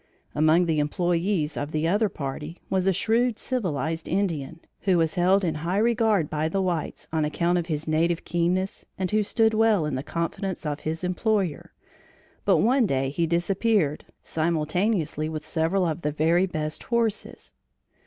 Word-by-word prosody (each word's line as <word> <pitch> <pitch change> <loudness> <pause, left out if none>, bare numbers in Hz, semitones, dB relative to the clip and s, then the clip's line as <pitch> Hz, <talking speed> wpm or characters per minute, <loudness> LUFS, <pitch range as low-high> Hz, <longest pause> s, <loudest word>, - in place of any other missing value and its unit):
Among 155 +4 +4
the 160 -2 +1
employees 170 +1 0
of 145 +1 -4
the 155 +1 0
other 205 +4 +2
party, 150 +3 -6
was 190 -1 +1
a - - +5
shrewd 230 +5 +1
civilized 165 - -2
Indian, 165 -5 -1 0.2
who 185 -3 +2
was 160 -2 +1
held 190 +2 +3
in 165 -3 +1
high 175 +4 -1
regard 220 -6 +2
by 155 +1 -1
the 195 - -1
whites 175 -5 -2
on 160 -1 +1
account 170 +4 +1
of 170 - -4
his 155 -2 -3
native 165 +2 +1
keenness, 180 +3 -1
and 185 0 -2
who 215 0 +3
stood 220 +2 +2
well 215 -6 +3
in 150 - -2
the 130 - -1
confidence 170 +4 -3
of 150 -1 -2
his 160 +2 -4
employer; 185 -2 -1 0.7
but - - +4
one 245 +1 +3
day 135 -3 0
he 165 +3 0
disappeared, 175 -1 +1 0.2
simultaneously 160 0 0
with 155 -1 -5
several 165 +4 +1
of 165 0 -2
the 150 - -1
very 165 +5 +2
best 155 -3 -3
horses. 230 -3 -2
170 Hz, 165 wpm, -25 LUFS, 155-195 Hz, 0.7 s, a